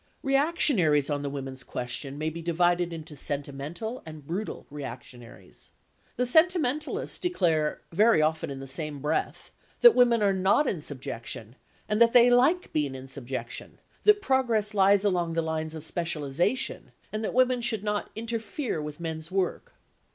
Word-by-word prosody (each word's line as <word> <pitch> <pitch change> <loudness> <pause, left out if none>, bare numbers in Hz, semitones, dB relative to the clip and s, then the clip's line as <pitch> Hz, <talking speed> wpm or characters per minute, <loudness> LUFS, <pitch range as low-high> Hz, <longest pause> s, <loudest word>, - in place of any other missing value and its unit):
Reactionaries 270 - +2
on 145 -1 -1
the 140 - -3
women's 135 -2 -6
question 130 +4 -5
may 155 +1 -2
be 165 +2 -7
divided 175 +1 +1
into 160 -2 -8
sentimental 145 - -4
and 155 -3 -11
brutal 190 +8 -4
reactionaries. 125 -4 -10 0.5
The 250 - 0
sentimentalists 310 0 +2
declare 165 - 0
(very 215 +3 +4
often 160 +1 0
in 135 -1 -6
the 135 - -7
same 150 +2 -2
breath) 150 +2 -2 0.3
that 480 -2 +9
women 240 -3 +4
are 200 -1 +3
not 190 +10 +3
in 175 -10 -2
subjection, 120 -5 -6 0.3
and 210 +2 0
that 230 0 +6
they 245 0 +7
like 280 +9 +3
being 145 -3 0
in 130 0 -9
subjection, 130 -3 -6 0.3
that 415 -1 +5
progress 235 - +1
lies 200 0 +4
along 175 -4 0
the 165 0 0
lines 160 0 -3
of 155 - -6
specialisation, 165 - -2 0.2
and 215 +1 -2
that - - -3
women 255 -1 +3
should 225 -4 -1
not 210 -1 -2
"interfere" 230 - -3
with 150 0 -7
men's 160 -1 -5
work. 190 -1 -2
170 Hz, 155 wpm, -27 LUFS, 145-230 Hz, 0.5 s, that